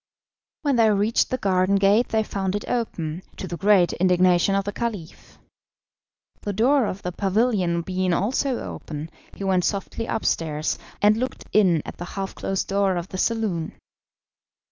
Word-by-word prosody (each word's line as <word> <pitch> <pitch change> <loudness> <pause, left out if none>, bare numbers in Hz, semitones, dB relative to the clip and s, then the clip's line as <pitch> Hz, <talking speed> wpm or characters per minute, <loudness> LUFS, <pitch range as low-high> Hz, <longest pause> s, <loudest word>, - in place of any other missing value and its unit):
When 280 -4 +2
they 225 -1 +5
reached 210 +2 +2
the 255 - -1
garden 190 -3 +2
gate 200 +4 +3
they 220 0 +1
found 195 -2 -2
it 205 - -4
open, 175 -9 -2 0.2
to - - -5
the 175 - -4
great 195 -1 +4
indignation 180 +1 +3
of 195 - +1
the 205 - -3
Caliph. 210 -8 -6 1.0
The 205 - -3
door 245 +4 +3
of 195 +1 -5
the 180 - -2
pavilion 190 -3 +1
being 185 +1 -1
also 245 +8 0 0.2
open, 155 +1 -7 0.2
he - - -7
went 190 -2 +2
softly 210 +4 -2
upstairs, 160 -8 -1 0.2
and 210 +1 +5
looked 255 +2 -4
in 180 -7 +4
at - - -8
the 175 - -6
half 195 0 -3
closed 195 -1 -2
door 195 -1 +1
of 175 +1 -5
the 185 - -5
saloon. 210 -9 -1
195 Hz, 165 wpm, -24 LUFS, 180-220 Hz, 1.0 s, they